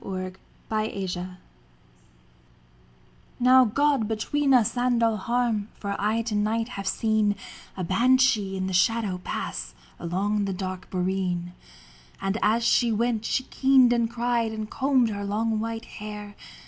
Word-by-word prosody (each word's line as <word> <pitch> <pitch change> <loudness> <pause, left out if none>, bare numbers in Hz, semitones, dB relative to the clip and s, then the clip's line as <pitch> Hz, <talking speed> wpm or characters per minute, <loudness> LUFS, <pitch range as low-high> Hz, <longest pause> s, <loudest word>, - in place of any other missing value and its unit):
THE 185 -1 -5 0.3
BANSHEE 190 -4 -3 2.0
Now 255 +1 +6
God 275 0 +1
between 275 +6 0
us 245 -4 +4
and 245 -1 +1
all 225 -1 +2
harm, 230 -1 0
For 200 -1 -4
I 220 +3 +1
to 230 -1 -4
night 220 +3 0
have 195 -5 -6
seen 215 0 +1 0.4
A 185 - -2
banshee 220 0 +3
in 190 - -2
the 190 - -3
shadow 200 0 +1
pass - - -5 0.2
Along 200 +4 -1
the 195 - -2
dark 185 0 -5
boreen. 180 -1 -2 0.7
And 195 +3 -1
as 225 +3 +2
she 235 0 +3
went 225 0 0
she 255 - 0
keened 265 -2 +4
and 235 -1 +1
cried 235 -1 0
And 215 -1 -6
combed 260 -3 +2
her 205 -1 -4
long 215 +2 -1
white 225 +1 -4
hair. 210 0 -8
215 Hz, 140 wpm, -26 LUFS, 195-235 Hz, 2.0 s, Now